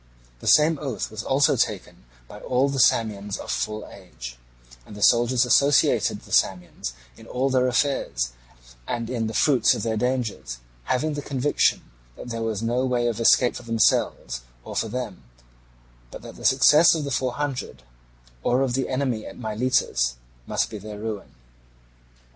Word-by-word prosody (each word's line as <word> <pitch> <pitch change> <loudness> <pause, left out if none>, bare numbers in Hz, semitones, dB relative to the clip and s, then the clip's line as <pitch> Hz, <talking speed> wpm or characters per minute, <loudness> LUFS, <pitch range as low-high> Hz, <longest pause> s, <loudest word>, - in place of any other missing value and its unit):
The - - -8
same 155 0 +5
oath 135 -8 -4
was 110 0 -5
also 135 +1 +3
taken - - -3 0.2
by 105 - -11
all 130 +5 +1
the 135 -1 -2
Samians 105 -4 +2
of - - -6
full 110 0 -3
age; 60 -11 -10 0.5
and 100 - -12
the 105 - -4
soldiers 120 +1 +4
associated 140 +3 +3
the - - -16
Samians 90 -9 0 0.2
in - - -14
all 130 +2 -1
their 130 -1 +3
affairs 125 - 0 0.6
and 120 0 -3
in 115 -3 -1
the 110 - -5
fruits 135 -6 +4
of - - -4
their 110 -1 -1
dangers, 120 - -2 0.3
having 150 +4 0
the 145 - -4
conviction 140 +1 +1 0.3
that - - -9
there 115 -1 -4
was 110 -1 -2
no 120 +3 0
way 125 -2 0
of 120 -2 -1
escape 120 +2 +4
for - - -6
themselves 110 - +1 0.2
or - - -8
for - - 0
them, 115 -3 -5 0.9
but - - -10
that - - -10
the - - -10
success 150 +6 +6
of 155 - -2
the 140 - -4
Four 130 -1 -1
Hundred 135 - -4 0.6
or 125 - +2
of 130 -2 -1
the 130 +1 -1
enemy 130 -4 -2
at - - -10
Miletus 110 - 0 0.3
must - - -1
be 105 - -6
their 105 +1 -8
ruin. 105 -1 -6
120 Hz, 170 wpm, -24 LUFS, 105-130 Hz, 0.9 s, success